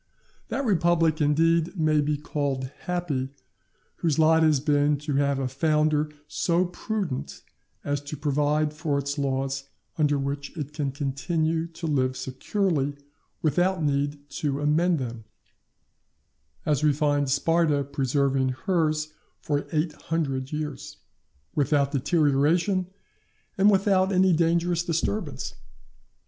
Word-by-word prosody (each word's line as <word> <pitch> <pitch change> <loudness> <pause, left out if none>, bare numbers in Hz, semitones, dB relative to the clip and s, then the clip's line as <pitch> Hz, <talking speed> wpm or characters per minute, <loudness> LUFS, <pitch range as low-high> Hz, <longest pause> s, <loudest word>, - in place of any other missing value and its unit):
That 275 - -2
republic, 170 -5 +2
indeed, 165 +4 +2
may 155 -1 +3
be 150 0 0
called 140 -3 -3 0.2
happy, 165 -7 -1 0.7
whose 160 -3 0
lot 160 0 +5
has 155 -3 +4
been 145 +1 +2
to 145 -1 -2
have 140 -1 +2
a 135 -1 -1
founder 150 +2 +1 0.2
so 175 +3 +1
prudent 180 -5 -4 0.4
as 145 -1 -1
to 145 +1 -6
provide 150 +1 +1
for 150 -2 -1
it 140 0 -2
laws 135 0 -1 0.3
under 145 -1 +3
which 140 +3 -4
it 150 -1 -5
can 145 -2 -2
continue 160 +4 -1
to 165 0 -8
live 130 -4 0
securely, 145 +1 -1 0.5
without 175 +3 +2
need 145 0 -1
to 140 -2 0
amend 160 +4 +2
them; 120 -4 -5 1.4
as 150 -1 +1
we 150 - +5
find 145 -1 +1
Sparta 155 0 +2
preserving 135 -1 0 0.2
hers 155 -4 +1 0.3
for 145 -1 -2
eight 155 0 0 0.2
hundred 135 -5 -1
years, 150 -3 -5 0.6
without 140 -1 +2
deterioration 160 +5 +2 0.7
and 200 0 +5
without 195 -1 +3
any 185 -1 +4
dangerous 170 +1 +2
disturbance. 175 +5 -2
150 Hz, 120 wpm, -26 LUFS, 140-165 Hz, 1.4 s, lot